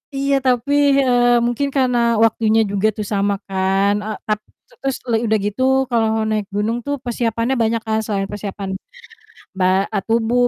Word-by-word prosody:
Iya 275 +1 +1
tapi, 255 +1 +1 0.3
eee, 245 -1 +4
mungkin 240 +4 -1
karena 240 -3 +2
waktunya 225 0 +2
juga 200 +1 0
tuh 210 - -3
sama 200 0 +1
kan, 195 +1 +1
e 210 - -6 0.2
tap 215 -1 0 0.3
te - - -23
terus 270 -1 0
le 230 - +2
udah 220 -1 +2
gitu 205 +4 -3 0.3
kalau 230 -3 +2 0.2
naik 215 -1 -1
gunung 215 +3 0
tuh 285 - -1
persiapannya 235 +1 -1
banyak 225 0 +1
kan, 220 0 +1
selain 200 -2 -1
persiapan, 200 -1 -5 0.9
ba 185 +1 +2
a - - +2
tubuh, 235 +2 +2
225 Hz, 165 wpm, -19 LUFS, 205-245 Hz, 0.9 s, eee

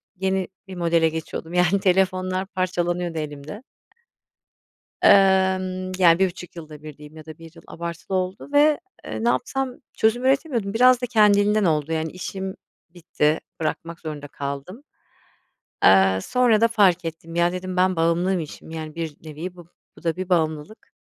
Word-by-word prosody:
yeni 190 0 -1 0.2
bir 190 - -8
modele 170 -2 +2
geçiyordum. 160 +1 -6
Yani 180 +2 +3
telefonlar 185 0 +1
parçalanıyordu 175 -3 -2
elimde. 150 - -6 1.4
Emm, 190 -1 +3
yani, 170 -2 +6
1,5 180 -2 -2
yılda 155 -2 -10
1 155 -2 -10
diyeyim 150 +1 -13
ya 155 0 -12
da 155 - -10
1 165 -1 -13
yıl 165 - -15
abartılı 170 +2 -5
oldu 185 +6 -3
ve, 295 +1 +4 0.2
eee, 225 - -5
ne - - +3
yapsam 255 +1 -1 0.2
çözüm 225 +3 +1
üretemiyordum. 260 -7 0
Biraz 250 +1 +5
da 245 - 0
kendiliğinden 210 -2 +4
oldu 155 -2 0
yani 160 0 -2
işim 190 +1 -6 0.3
bitti, 160 -3 -1 0.2
bırakmak 165 +2 -4
zorunda 150 -3 -7
kaldım. 140 - -6 1.0
Eee, 95 0 +6
sonra 245 -4 +2
da 230 - +5
fark 190 -6 +3
ettim, 165 0 -7
ya, 170 0 +2
dedim 185 0 -5
ben 185 -1 +2
bağımlıymışım, 170 -1 -1
yani 155 -1 -6
bir 165 -3 -5
nevi 160 +4 -7
bu, 175 -1 -14 0.3
bu - - -17
da 165 -1 -1
bir 185 0 -5
bağımlılık. 160 +2 -1
180 Hz, 150 wpm, -23 LUFS, 160-195 Hz, 1.4 s, yani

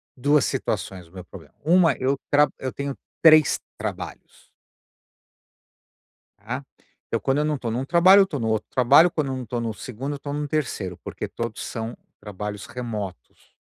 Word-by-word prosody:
2 145 +2 +3
situações, 90 -3 -3
o - - -24
meu 90 -1 -9
problema. - - -13
Uma 165 0 +5
eu 135 +2 +1
tra 145 +1 +6
eu 130 -1 -4
tenho 140 -1 -4 0.3
3 155 -3 +6 0.2
trabalhos. - - -7 1.9
Tá? 120 +7 -5 0.5
Eu - - 0
quando 135 +1 +1
eu 150 - +2
não 150 -1 0
tô 120 -3 -3
num 125 +4 -2
trabalho, 180 +6 +6
eu 195 - +5
tô 150 - -4
no 115 -2 -1
outro 110 -1 -1
trabalho, 140 +7 +6
quando 155 -5 -2
eu - - -3
não 130 -1 -6
tô 120 +2 -3
no 115 -1 -2
segundo, 130 +7 -5
eu - - -6
tô 145 +1 -6
no 145 0 -2
terceiro, 125 - -2
porque - - -5
todos 115 -2 -5
são 115 +1 -5 0.2
trabalhos 105 0 -6
remotos. 105 - -7
130 Hz, 175 wpm, -24 LUFS, 110-150 Hz, 1.9 s, tra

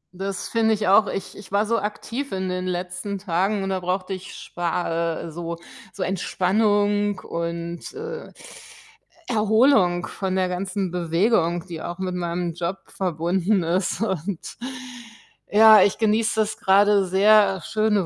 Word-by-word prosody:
Das 195 +1 -4
finde 225 -1 +2
ich 210 0 -2
auch. 200 +2 +5
Ich 190 - -5
ich 200 -2 -12
war 200 +2 +2
so 230 +1 +1
aktiv 230 +6 -5
in 190 0 -2
den 185 0 -3
letzten 180 +2 -4
Tagen 195 +2 0
und 195 - -3
da 190 - -1
brauchte 185 +1 -2
ich 185 0 -8
spa 170 -1 -2
äh, 165 - -7
so 170 +1 -5 0.3
so 195 - -4
Entspannung 205 +2 +1
und, 170 0 -5
äh, 465 +2 -7 1.0
Erholung 220 -5 +3
von 190 -1 -3
der 185 -1 +1
ganzen 190 +1 -3
Bewegung, 175 0 +1
die 165 -3 -7
auch 175 - -5
mit 185 -1 -3
meinem 175 -1 -2
Job 175 +3 -3
verbunden 180 +2 0
ist. 180 +5 -1
Und 190 -3 -3 0.9
ja, 220 0 +8
ich 200 - +1
genieße 220 0 +2
das 215 0 -2
grade 200 0 +4
sehr, 200 +1 +5
äh, - - -11
schöne 215 -3 +1
190 Hz, 150 wpm, -23 LUFS, 175-210 Hz, 1.0 s, ja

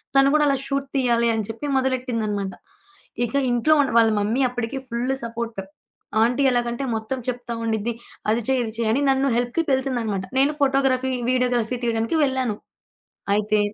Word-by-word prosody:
తను 275 0 +6
కూడా 305 -1 +4
అలా 280 - +3
షూట్ 275 0 -2
తీయాలి 240 -3 +2
అని 220 -2 -1
చెప్పి 225 +6 -5
మొదలెట్టిందనమాట. 230 -7 -1 0.7
ఇక 240 - -6 0.2
ఇంట్లో 240 +6 +3
ఉండ 275 - 0
వాళ్ళ 225 -1 +6
మమ్మీ 220 +6 0
అప్పడికే 245 +1 -4
ఫుల్ 245 +3 -1
సపోర్ట్ 230 -2 -4 0.6
ఆంటీ 245 +4 +2
ఎలాగంటే 240 +1 -1
మొత్తం 220 +4 -3
చెప్తా 245 -1 -3
ఉండిద్ది. 225 +1 -1 0.4
అది 230 - +1
చెయ్ 260 -1 +2
ఇది 220 -2 -5
చెయ్ 230 -2 0
అని 275 - +1
నన్ను 270 +1 +2
హెల్ప్‌కి 245 +7 0
పిలిచిందన్నమాట. 240 -7 0 0.2
నేను 280 +3 +3
ఫోటోగ్రఫీ, 265 -1 +2 0.2
వీడియోగ్రఫీ 250 -2 +1
తీయడానికి 230 +5 0
వెళ్ళాను. 260 -5 -1 0.8
అయితే 210 0 +1
245 Hz, 155 wpm, -23 LUFS, 225-265 Hz, 0.8 s, తను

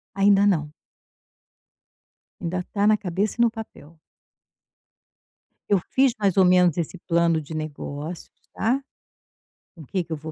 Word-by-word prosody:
Ainda 200 0 +4
não. 150 -6 +1 1.7
Ainda 180 +2 -2
está 200 +2 -2
na 215 0 +5
cabeça 195 +1 -2
e - - +4
no 235 - +5
papel. 170 -8 -11 1.7
Eu 200 -2 +4
fiz, 265 -2 +3
mais 200 -3 0
ou 190 - +6
menos, 180 -2 +4
esse 170 +2 -3
plano 170 -2 +1
de 155 +2 -10
negócios, 155 +1 -6 0.2
tá, 250 +6 0 0.9
com 165 - -12
o - - -11
que 185 +3 -2
que 165 - -18
eu 160 - 0
vou 155 +1 -8
180 Hz, 145 wpm, -24 LUFS, 160-200 Hz, 1.7 s, ou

